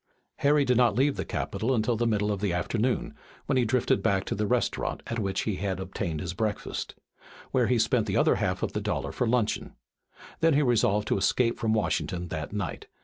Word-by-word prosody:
Harry 145 0 +3
did 125 -2 +2
not 120 -5 +4
leave 135 +3 +2
the - - -2
Capitol 130 +4 -1
until 115 +1 +1
the 120 +1 0
middle 105 -2 +1
of 100 -2 -3
the 100 -3 +1
afternoon, 110 +8 -1 0.3
when 140 - 0
he 130 - +3
drifted 115 -3 +1
back 95 0 +1
to - - -2
the 105 0 -1
restaurant 125 +1 -1
at 115 - -3
which 95 -2 -1
he 105 -4 -2
had 95 -1 -2
obtained 95 -4 -3
his 85 -2 -4
breakfast, 105 +2 -3 0.6
where 125 -3 +2
he 125 - +2
spent 110 0 +2
the 95 - 0
other - - +4
half - - -1
of - - -2
the - - -2
dollar - - -2
for 125 - -1
luncheon. 115 -2 0 0.6
Then 165 -2 +4
he 150 - +4
resolved 115 -4 +2
to - - +2
escape 115 +5 +1
from 110 -1 +1
Washington 90 -4 -1
that 80 -2 -4
night. 100 -4 -4
110 Hz, 210 wpm, -27 LUFS, 95-125 Hz, 0.6 s, not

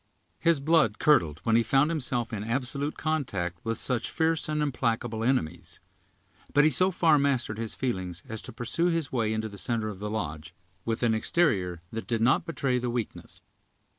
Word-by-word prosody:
His 165 -3 +3
blood 150 -7 +3
curdled 85 - +3
when 115 - +2
he 115 - +5
found 135 +7 +3
himself 125 -6 -1
in 105 -1 -3
absolute 130 +5 -2
contact 100 - -2
with 115 0 -2
such 125 -4 -1
fierce 160 -1 0
and 155 0 0
implacable 120 -5 -1
enemies; 90 -10 -1 0.8
but 145 - +6
he 155 - +5
so 185 +8 +4
far 165 -5 +3
mastered 130 -6 0
his 115 -1 -3
feelings 95 -9 -3
as 110 -1 -4
to - - -8
pursue 120 +9 -1
his 165 -5 -1
way 115 -4 0
into 110 0 -1
the 100 -2 -8
center 115 -2 -1
of 100 -3 -8
the 105 +1 -4
lodge, 85 -5 -5 0.3
with 115 +1 -2
an 115 -2 +3
exterior 100 - +1
that 115 0 -5
did 115 -2 0
not 120 +4 +3
betray 135 -6 0
the 125 0 -2
weakness. 120 -3 -5
120 Hz, 185 wpm, -28 LUFS, 110-145 Hz, 0.8 s, but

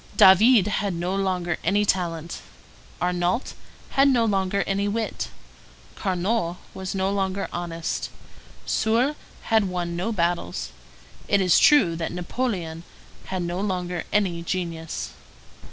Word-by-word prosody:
David 205 +3 +7
had 200 -2 -1
no 175 +3 -2
longer 180 -3 -1
any 205 +4 +2
talent, 170 -4 -1 0.6
Arnault 180 +6 0 0.4
had 275 +1 +5
no 240 -4 +3
longer 195 -2 +1
any 200 +1 0
wit, 220 +2 -2 0.6
Carnot 185 -1 -1 0.2
was 190 0 -5
no 190 0 +1
longer 195 0 -1
honest, 170 -1 -3 0.6
Soult 235 +7 +1 0.4
had 220 -2 +5
won 175 -1 -3
no 185 +6 -1
battles; 170 - -1 0.6
it 200 - +3
is 180 -3 +5
true 195 - +5
that 165 - -3
Napoleon 175 -3 -3 0.4
had 185 -2 -3
no 175 +1 -3
longer 180 -3 -2
any 185 -5 +1
genius. 165 - -4
185 Hz, 120 wpm, -24 LUFS, 175-205 Hz, 0.6 s, David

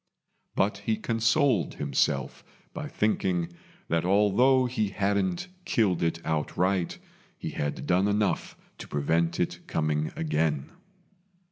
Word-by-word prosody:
But 100 0 +1
he 110 +1 -1
consoled 115 - +2
himself 70 -2 0 0.3
by - - -5
thinking 90 -5 0 0.3
that 85 0 +1
although 105 +8 +4
he 120 -4 0
hadn't 100 -2 0 0.2
killed 110 - +1
it 85 0 0
outright, 90 +4 0 0.4
he - - -5
had 75 0 -3
done 95 +3 +3
enough 105 -1 0 0.2
to - - -8
prevent 80 +3 0
it 90 - -1
coming 75 -1 0
again. 75 -2 0
95 Hz, 115 wpm, -27 LUFS, 80-105 Hz, 0.4 s, although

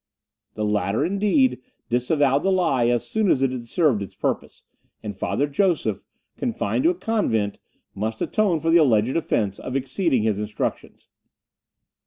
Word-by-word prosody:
The 105 - -2
latter, 105 +5 0
indeed, 210 - +2 0.3
disavowed 140 +3 +2
the 195 - +1
lie 160 -10 +2
as 120 -1 0
soon 220 -3 0
as 135 - +3
it 135 - +2
had 120 -2 -6
served 140 - +2
its 100 - -7
purpose, - - -3 0.4
and 105 -2 -5
Father 135 +8 -1
Joseph, 170 +4 0 0.4
confined 250 +3 -1
to - - +6
a 360 - 0
convent, 155 - -1 0.3
must 110 +2 -3
atone 195 -7 +1
for 165 - +1
the 170 - +7
alleged 120 -3 +2
offence 105 -11 -1
of 130 - -6
exceeding 135 - 0
his 110 -2 0
instructions. 105 0 -4
135 Hz, 155 wpm, -23 LUFS, 110-180 Hz, 0.4 s, the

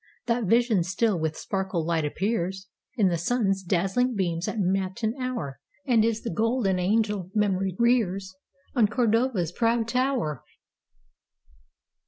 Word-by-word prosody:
That 235 -1 0
vision 230 -1 +3
still 195 +2 0
with 160 0 -2
sparkling 190 -4 -2
light 165 -2 0
appearsIn 190 +2 -2 0.5
the 170 - 0
sun's 195 0 0
dazzling 195 +7 0
beams 175 -3 -1
at - - -3
matin 195 +4 0
hour, 235 - -4 0.3
And 235 -4 +4
is 225 0 0
the 230 - -3
golden 220 -2 +1
angel 205 -1 0
memory 195 -3 +1
rearsOn 195 -2 0
Cordova's 230 - +1
proud 230 +2 +1
tower! 250 - -1
200 Hz, 120 wpm, -26 LUFS, 185-230 Hz, 0.5 s, And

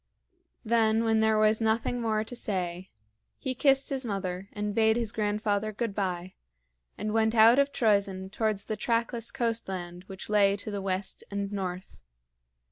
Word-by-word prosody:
Then 225 -1 +2
when 225 -1 +2
there 220 0 +3
was 215 +1 +3
nothing 225 +2 0
more 215 -2 0
to 235 +3 -9
say, 185 -5 -3 0.5
he 260 -2 -2
kissed 270 +2 +3
his 270 -1 0
mother 195 -3 -4
and 210 0 -3
bade 220 0 +3
his 230 -3 -1
grandfather 210 -1 -1
good 225 0 -3
by, 185 -2 -3 0.6
and 210 0 -3
went 220 0 +2
out 230 +4 +7
of 280 0 +2
Troezen 200 -6 +1
towards 215 -2 -1
the 215 - -3
trackless 230 +1 -1
coastland 190 -7 -3
which 190 0 -8
lay 200 -1 +3
to 210 +1 -6
the 200 -1 -3
west 190 0 -2
and 200 0 -3
north. 185 -2 -5
215 Hz, 160 wpm, -28 LUFS, 195-225 Hz, 0.6 s, out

